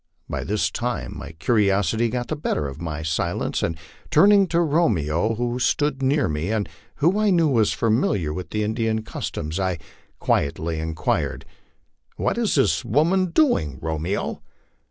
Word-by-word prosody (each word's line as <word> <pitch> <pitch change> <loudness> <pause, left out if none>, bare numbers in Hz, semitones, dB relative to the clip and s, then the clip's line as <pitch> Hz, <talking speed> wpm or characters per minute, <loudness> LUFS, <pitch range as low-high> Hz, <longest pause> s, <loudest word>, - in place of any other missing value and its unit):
By - - -3
this 105 +1 0
time 120 0 -3
my - - -8
curiosity 105 +3 +1
got 120 +1 -3
the 155 - -1
better 110 - -1
of 70 +4 -8
my 80 -2 -4
silence, 85 +2 -1
and 85 -1 -1 0.3
turning 195 +5 +6
to 170 -1 +1
Romeo, 110 - +1
who 120 +2 -2
stood 140 +1 +1
near 140 +3 +2
me, 75 +4 -2
and 110 -2 0 0.3
who 170 +8 +2
I 215 -1 +3
knew 170 -4 +4
was 115 -7 +3
familiar 110 - +1
with 90 +2 -6
Indian 110 +1 0
customs, 85 -7 -4
I 95 -2 0 0.4
quietly 80 +3 0
inquired, 80 -1 -2 0.7
"What - - 0
is - - +1
this - - +2
woman 170 - +2
doing, 165 - +2
Romeo?" 80 +5 -3
110 Hz, 150 wpm, -23 LUFS, -, 0.7 s, turning